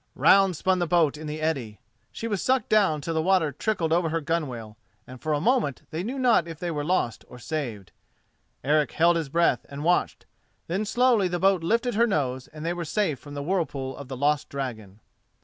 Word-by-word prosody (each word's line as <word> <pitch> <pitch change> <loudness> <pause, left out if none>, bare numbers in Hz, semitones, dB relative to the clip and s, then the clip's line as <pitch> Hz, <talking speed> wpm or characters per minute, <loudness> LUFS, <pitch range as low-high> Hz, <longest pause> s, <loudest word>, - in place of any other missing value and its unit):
Round 195 -3 +5
spun 185 +2 +1
the 175 - 0
boat 160 -3 +3
in 155 +1 -8
the 150 +1 -4
eddy, 135 -10 -2 0.3
she 230 - -5
was 205 -4 -2
sucked 260 0 +1
down 195 -8 +3
till 165 +3 -3
the 160 - +1
water 180 -3 +2
trickled 165 +1 -1
over 170 -1 +2
her 165 +1 0
gunwale, 135 -9 -3 0.3
and 130 -1 -12
for 155 - -2
a 150 - +1
moment 220 - +1
they 160 - -3
knew 245 +8 -4
not 245 - +3
if 165 -2 -7
they 175 +1 -3
were 150 -2 -2
lost 150 -9 -1
or 125 - -12
saved. 120 - -5 0.7
Eric 150 +2 +2
held 170 +1 +4
his 160 -4 -2
breath 170 -4 +2
and 140 +1 -6
watched, 175 +2 +1 0.4
then 190 +6 -2
slowly 240 -3 +3
the 175 0 -2
boat 190 0 +3
lifted 235 +7 +1
her 235 +3 +3
nose, 130 - -1
and 155 0 -9
they 170 - 0
were 175 0 -4
safe 160 - -1
from 145 +2 -11
the 145 - -4
whirlpool 145 -6 -2
of 140 - -9
the 130 -1 -6
lost 145 +1 +1
dragon. 110 -7 -6
160 Hz, 215 wpm, -26 LUFS, 140-185 Hz, 0.7 s, Round